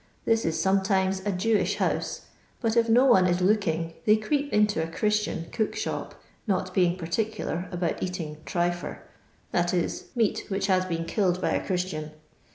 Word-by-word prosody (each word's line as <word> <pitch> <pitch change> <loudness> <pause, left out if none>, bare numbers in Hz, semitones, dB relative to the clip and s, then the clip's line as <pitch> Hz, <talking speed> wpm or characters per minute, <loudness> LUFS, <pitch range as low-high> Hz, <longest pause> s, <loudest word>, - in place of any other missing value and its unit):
This 225 0 +2
is 160 - 0
sometimes 190 0 +2
a - - +2
Jewish 210 +3 +1
house, - - -1 0.4
but 225 -2 0
if 230 -1 +3
no 245 +4 +6
one 190 -8 +6
is 175 0 +1
looking 170 -4 +1
they 215 - +6
creep 285 +7 -1
into 210 -5 +3
a 160 - -2
Christian 210 -2 0
' - - -19
cook 220 -2 -1
shop,' - - -4 0.3
not 185 -2 0
being 180 -1 +2
particular 185 0 -2
about 175 -2 -2
eating 170 -5 -4
' - - -23
tryfcr' 175 0 -1 0.3
— - - -36
that 175 +1 +1
is, 175 - -1
meat 225 -4 +1
which 195 -1 -1
has 185 -1 +2
been 165 -2 -2
killed 180 0 +1
by - - 0
a - - 0
Christian. 180 -5 -2
185 Hz, 180 wpm, -27 LUFS, 175-210 Hz, 0.4 s, no